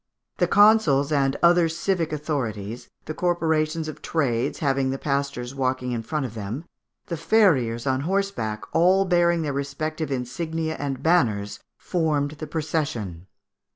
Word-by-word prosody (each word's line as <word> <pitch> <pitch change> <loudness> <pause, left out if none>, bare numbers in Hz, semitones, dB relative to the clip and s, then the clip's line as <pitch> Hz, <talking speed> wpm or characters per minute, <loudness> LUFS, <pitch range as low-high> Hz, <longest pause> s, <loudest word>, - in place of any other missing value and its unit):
The - - +2
consuls 205 -10 +5
and 140 -2 +1
other 170 -1 +5
civic 170 0 -1
authorities, 120 -8 -4 0.2
the 155 - -4
corporations 160 -2 0
of 155 - -7
trades 125 -7 0
having 135 -2 +1
the 135 - -2
pastors 140 -3 -2
walking 130 -2 -1
in 120 -2 -2
front 145 +5 -2
of 115 - -6
them, 115 - -5 0.4
the 170 - -4
farriers 145 - +2
on 130 -1 +1
horseback, 170 - -2
all 185 +3 +4
bearing 175 -2 +2
their 145 -2 -2
respective 150 +3 -3
insignia 160 +6 -3
and 135 -2 -3
banners, 110 -12 +1 0.2
formed 150 -5 0
the 155 - -5
procession. 145 - -3
150 Hz, 140 wpm, -24 LUFS, 130-165 Hz, 0.4 s, consuls